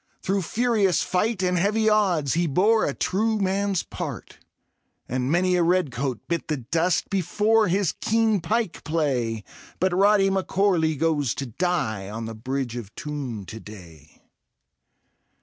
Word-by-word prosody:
Through 195 +1 0
furious 215 -2 +1
fightj 190 0 0
and 180 -1 +1
heavy 210 +4 +1
oddsi 190 -10 +2
He 170 +1 +1
lx)re 205 +7 +3
a - - -3
true 220 +3 0
man's 195 -1 0
part; - - -7 0.7
And 125 +1 -2
many 180 +2 +2
a 175 - +2
red 175 -3 +2
coat 125 -4 -3
bit 170 -1 -2
the 150 - -1
dust 165 +8 0
Before 210 +4 +2
his 185 0 +1
keen 220 -2 +1
pike 220 -2 -1
play 130 -9 -1 0.2
— - - -22
But 185 0 +1
Rody 195 0 +4
M'Corley 185 -4 +1
goes 145 -4 +1
to 135 - -4
die 115 - -2
On 115 +2 -5
the 115 - -6
Bridge 130 +2 -3
of 115 -5 -7
Toome 135 -9 -5
to 110 - -8
day. 85 -9 -14
175 Hz, 150 wpm, -24 LUFS, 130-195 Hz, 0.7 s, Rody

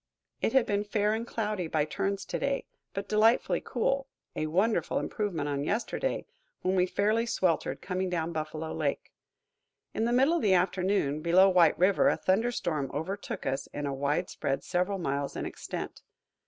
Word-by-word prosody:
It - - +1
had 265 -3 +5
been 205 0 0
fair 210 0 +1
and 230 +2 -3
cloudy 210 -7 -2
by 155 -2 +1
turns 195 +5 -2
to - - -3
day, 275 0 -1 0.3
but 195 0 -3
delightfully 220 +2 +3
cool, 275 0 0 0.3
a 155 - -1
wonderful 195 +8 +1
improvement 180 -9 -2
on 140 -1 -1
yesterday, 235 - -1 0.4
when 185 - +1
we 185 -1 +3
fairly 215 +5 +1
sweltered, 180 -7 0
coming 185 0 -1
down 170 -2 -1
Buffalo 155 0 -4
Lake. - - -2 0.8
In 225 - 0
the 235 - +1
middle 265 +6 +4
of - - -2
the 195 -3 +4
afternoon, 180 -5 +1
below 180 +4 +6
White 175 -4 +5
River, 200 +10 +4
a - - +1
thunder 220 +6 +2
storm 155 - -2
overtook 195 +7 -4
us 135 0 -2
in 145 - -5
a 140 - -2
widespread 140 0 -1
several 180 +2 0
miles 140 -5 -2
in - - -3
extent. - - -6
190 Hz, 170 wpm, -29 LUFS, 160-215 Hz, 0.8 s, below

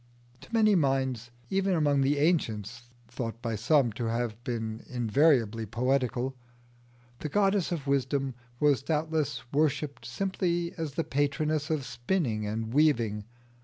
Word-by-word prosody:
To - - -15
many 220 -2 +4
minds 135 - +1 0.2
even 195 -1 +2
among 145 -3 +3
the 140 +2 +2
ancients 120 - 0 0.2
(thought 115 -1 -5
by 115 -2 -2
some 130 +3 +3
to 115 +3 -4
have 115 0 -2
been 115 -3 -4
invariably 120 -2 +2
poetical) 125 +2 0 0.8
the 150 - -4
goddess 195 +1 +2
of 160 -5 -3
wisdom 135 -1 0 0.3
was 145 -3 +3
doubtless 155 0 -1
worshipped 145 -1 0
simply 175 -3 -1
as 155 -4 -4
the 165 - 0
patroness 145 +2 0
of 155 -4 -1
spinning 120 - -1
and 110 +2 -3
weaving. 115 -9 +2
135 Hz, 130 wpm, -29 LUFS, 115-155 Hz, 0.8 s, many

